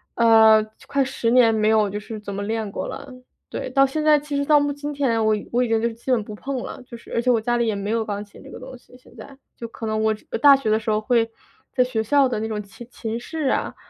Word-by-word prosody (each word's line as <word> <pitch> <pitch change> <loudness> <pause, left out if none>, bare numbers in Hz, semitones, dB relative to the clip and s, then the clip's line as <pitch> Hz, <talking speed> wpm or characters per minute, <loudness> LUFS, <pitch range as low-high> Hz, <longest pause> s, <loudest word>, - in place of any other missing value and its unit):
呃， 220 -2 +6 0.2
快 275 -1 +1
10 240 -3 -2
年 240 -3 +5
没 215 0 +2
有 215 -2 +3
就 205 +1 -4
是 215 +1 -8
怎 205 -1 -7
么 200 - -4
练 220 -1 -3
过 - - -4
了。 280 -2 -8 0.4
对， - - -5
到 275 -1 +4
现 305 +3 -3
在， 305 -1 +5
其 290 0 -6
实 280 - 0
到 295 0 +5
今 290 +1 -6
天 240 -6 0
我 215 0 +3 0.2
我 245 +1 +2
已 245 - -1
经 225 +1 0
基 235 +3 -10
本 230 -4 +2
不 210 - -9
碰 275 +4 -5
了， - - -8
就 235 - -9
是 - - -13
而 235 - +1
且 250 - 0
我 235 - +4
家 240 +2 -1
里 235 -1 0
也 215 - 0
没 200 +2 -4
有 225 -1 0
钢 205 -1 -4
琴 205 - -17
这 - - -13
个 - - -9
东 260 +1 -10
西 250 - -19
现 255 - -21
在， 275 -1 -12 0.2
就 230 - -7
可 225 0 -8
能 215 0 -1
我 220 - +3 0.3
大 285 -1 +8
学 245 -6 -1
的 220 - +3
时 220 - -5
候 215 0 +2
会 230 0 +1 0.4
在 255 - +2
学 250 -3 -2
校 275 +4 +3
的 240 -4 -3
那 220 - -3
种 210 -1 -3
琴 230 +4 -13
琴 225 0 -5
室 300 +3 -3
啊， - - -2
230 Hz, 295 characters per minute, -22 LUFS, 220-265 Hz, 0.4 s, 大